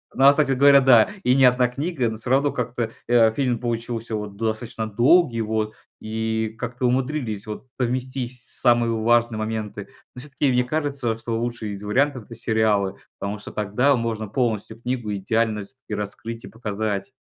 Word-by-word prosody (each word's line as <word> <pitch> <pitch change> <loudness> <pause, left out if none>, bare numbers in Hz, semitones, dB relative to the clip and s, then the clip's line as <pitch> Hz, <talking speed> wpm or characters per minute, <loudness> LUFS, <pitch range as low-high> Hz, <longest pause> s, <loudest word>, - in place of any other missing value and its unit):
Ну, 135 - +4
а 140 - +10
кстати 145 -1 +2
говоря, 140 +1 +6
да, 125 -4 +6
и 125 - +4
не 135 -1 +6
одна 125 0 +4
книга, 135 0 -2
но 110 - -5
всё 115 +3 -7
равно 140 +2 +3
как-то, 120 -2 -3 0.2
э, 115 -2 +5
фильм 125 -1 0
получился 115 -1 -3
вот 105 -1 -5
достаточно 110 +1 -3
долгий 120 - +4
вот, 110 0 -1 0.3
и 110 0 -2
как-то 125 +3 -3
умудрились 125 -4 -1
вот 110 +4 -7
совместить 125 0 -2
самые 120 0 +2
важные 115 0 +2
моменты. 110 -1 -4 0.3
Но - - -8
всё-таки 145 0 -1
мне 125 0 +3
кажется, 140 -4 -1
что 115 0 -3
лучший 120 -2 -3
из 100 0 -7
вариантов- 130 +4 +1
это 115 - -11
сериалы, 110 -4 +1 0.2
потому 100 +1 -3
что 105 - -10
тогда 110 +7 +2
можно 115 -2 -2
полностью 110 -1 -2
книгу 120 -4 -2
идеально 110 +2 0
всё-таки 130 +2 -11
раскрыть 110 +3 -6
и - - -9
показать. 105 -1 -3
115 Hz, 170 wpm, -23 LUFS, 110-125 Hz, 0.3 s, а